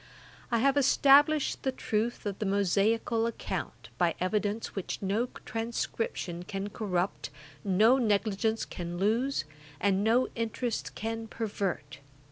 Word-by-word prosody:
I 235 - +2
have 275 +4 +3
established 285 +2 +5
the 265 - 0
truth 230 -2 -2
of 200 -2 -3
the 215 - -1
Mosaical 210 +4 +2
account, 235 - -5
by 175 -2 +2
evidence 205 +3 -1
which 195 - -3
no 205 +5 0 0.2
transcription 225 -6 -3
can 195 +3 -4
corrupt, 190 -4 -2 0.3
no 215 +6 +4
negligence 220 0 +1
can 175 0 -6
lose, 225 - +1 0.3
and 195 0 +2
no 235 +4 +3
interest 230 +1 -3
can 225 +1 -4
pervert. 195 - -3
220 Hz, 120 wpm, -30 LUFS, 195-235 Hz, 0.3 s, established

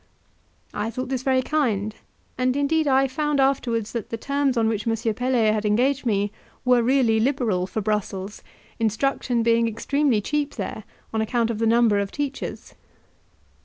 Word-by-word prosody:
I 215 - -2
thought 255 +3 -5
this 260 -2 -1
very 260 -1 +2
kind, 220 -9 0 0.4
and 255 +1 +1
indeed 305 +2 +1
I 270 0 +4
found 295 +2 -1
afterwards 240 -5 +1
that 230 -4 -4
the 230 - -3
terms 280 0 0
on 225 -1 +3
which 220 0 -2
M. 225 - +2 0.2
Pelet 240 -2 +2
had 215 -1 -1
engaged 250 +6 +1
me 205 -2 +1 0.3
were 250 -1 +5
really 235 -2 +3
liberal 225 -7 0
for 220 - -3
Brussels; 205 -1 -3 0.4
instruction 235 +1 0
being 230 0 +3
extremely 260 +2 +1
cheap 295 +6 -2
there 215 - -5 0.3
on 220 - +1
account 230 +1 0
of 220 - -4
the 225 - +2
number 230 -2 +4
of 200 -1 -2
teachers. 285 -2 -5
235 Hz, 165 wpm, -24 LUFS, 220-270 Hz, 0.4 s, were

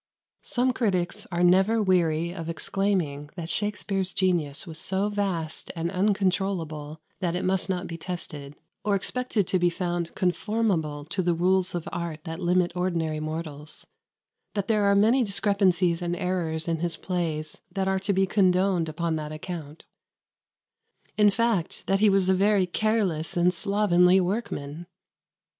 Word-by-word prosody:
Some 255 +1 +1
critics 185 -8 -1
are 175 0 0
never 190 +6 +4
weary 170 -4 +2
of 165 -3 -6
exclaiming 165 -5 -1
that 170 -2 -5
Shakspere's 200 -2 -1
genius 175 -7 +1
was 165 -2 -5
so 195 +5 0
vast 190 -6 -2
and 170 +1 -2
uncontrollable 185 -6 -1 0.2
that 175 -2 -1
it 180 - -2
must 190 0 +1
not 185 -1 -1
be 165 -1 -7
tested, 150 -5 -6 0.3
or 205 -1 +2
expected 230 0 -1
to 185 - 0
be 175 0 +3
found 175 -1 -3
conformable 180 -6 0
to 180 +5 -2
the 175 -1 +1
rules 185 +1 +2
of 175 - -4
art 170 -3 -4
that 165 -1 -6
limit 180 0 +2
ordinary 165 -4 -1
mortals; 155 -1 -5 0.7
that 200 -1 -1
there 215 -2 +2
are 200 0 +4
many 225 +6 +4
discrepancies 195 -4 +2
and 175 0 -1
errors 175 -4 -1
in 165 -1 0
his 170 -1 -2
plays 160 -4 -3
that 195 -1 -1
are 190 0 +1
to 195 +2 -1
be 195 0 +3
condoned 185 -3 +2
upon 165 0 -1
that 150 -1 -5
account; 155 -1 -7 1.3
in 210 -1 +5
fact, 205 -4 0
that 195 0 +2
he 215 0 +5
was 195 -1 +3
a 190 - +4
very 200 0 +3
careless 185 -5 0
and 175 +1 +3
slovenly 185 -1 +3
workman. 175 -5 -3
180 Hz, 150 wpm, -26 LUFS, 165-195 Hz, 1.3 s, in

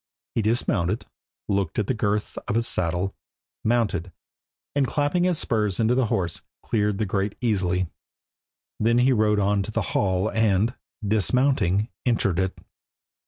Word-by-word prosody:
He 115 - +1
dismounted, 105 -3 +1 0.4
looked 100 -4 0
to 110 - +1
the 120 - -1
girths 105 -2 -1
of - - -1
his 115 0 +1
saddle, 90 0 -1 0.5
mounted, 105 -7 +1 0.6
and 140 -2 +2
clapping 150 +7 +1
his 180 -3 +2
spurs 105 -7 0
into 115 +1 +3
the 125 -2 +2
horse, 90 -5 -1 0.2
cleared 105 -2 0
the 110 - 0
grate 100 +1 -1
easily. 95 -6 +1 0.9
Then 115 +2 +3
he 130 +2 +4
rode 105 -2 +3
on 100 0 +2
to 95 - -4
the 115 0 0
hall 95 +1 +1
and, 110 +1 +2 0.3
dismounting, 110 -1 +2
entered 105 -7 +1
it. 95 0 -1
105 Hz, 145 wpm, -25 LUFS, 95-115 Hz, 0.9 s, he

